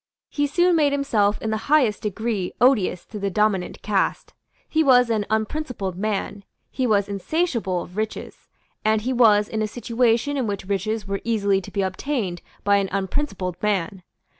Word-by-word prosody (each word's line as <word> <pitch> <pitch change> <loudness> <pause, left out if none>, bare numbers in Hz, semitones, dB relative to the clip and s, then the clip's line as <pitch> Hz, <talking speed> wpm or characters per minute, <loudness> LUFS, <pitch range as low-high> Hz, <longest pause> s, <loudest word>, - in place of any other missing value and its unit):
He 290 0 0
soon 350 +4 +3
made 295 -3 +3
himself 215 -8 +1
in 220 - -1
the 220 0 -3
highest 265 -9 +3
degree 210 -2 -2
odious 215 -8 +3
to 210 - -8
the 200 0 -1
dominant 205 -2 0
caste. 200 -2 -1 0.3
He 315 0 +2
was 250 -4 +5
an 210 -2 0
unprincipled 220 - -2
man; 205 0 -3 0.3
he 260 -2 -1
was 205 -3 +2
insatiable 205 - -1
of 180 - -14
riches; 215 +1 -5 0.4
and 215 0 +2
he 255 +2 -1
was 210 -4 +5
in 220 0 -3
a 215 - 0
situation 240 +4 0
in 255 -4 -1
which 200 -2 -4
riches 205 +2 -2
were 195 0 -3
easily 200 -4 +1
to - - -10
be 200 - -1
obtained 190 -2 -2 0.2
by 200 0 +4
an 195 -1 0
unprincipled 190 - -3
man. 195 -2 -1
215 Hz, 170 wpm, -23 LUFS, 195-245 Hz, 0.4 s, was